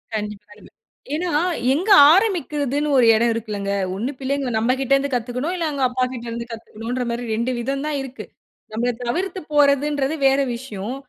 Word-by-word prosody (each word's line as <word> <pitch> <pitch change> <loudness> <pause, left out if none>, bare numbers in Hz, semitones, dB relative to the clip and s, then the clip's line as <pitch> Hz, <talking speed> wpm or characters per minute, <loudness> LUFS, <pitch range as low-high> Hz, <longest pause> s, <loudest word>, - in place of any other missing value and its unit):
கண்டிப்பாலுமே. 210 -1 -7 0.5
ஏன்னா, 350 +3 -2 0.4
எங்க 355 +9 -1 0.2
ஆரம்பிக்கிறதுன்னு 300 - 0
ஒரு 250 - +5
எடம் 230 +1 +2
இருக்குல்லங்க. 210 -3 -4 0.2
1 230 +8 -2
பிள்ளைங்க 275 0 -2
நம்மகிட்டேருந்து 270 +4 +1
கத்துக்கணும், 250 +7 -2
இல்ல 335 -3 -1
அவுங்க 280 -3 -2
அப்பாக்கிட்டருந்து 240 -2 -3
கத்துக்கணும்ன்றமாரி 235 +2 -4
2 235 +3 -1
விதம் 275 +4 -2
தான் 300 -2 -1
இருக்கு. 265 -1 -8 0.5
நம்பள 240 +3 0
தவிர்த்து 360 +9 -2
போறதுன்றது 285 0 +2
வேற 270 +1 +3 0.2
விஷயம். 235 -2 -6
255 Hz, 130 wpm, -21 LUFS, 235-285 Hz, 0.5 s, ஒரு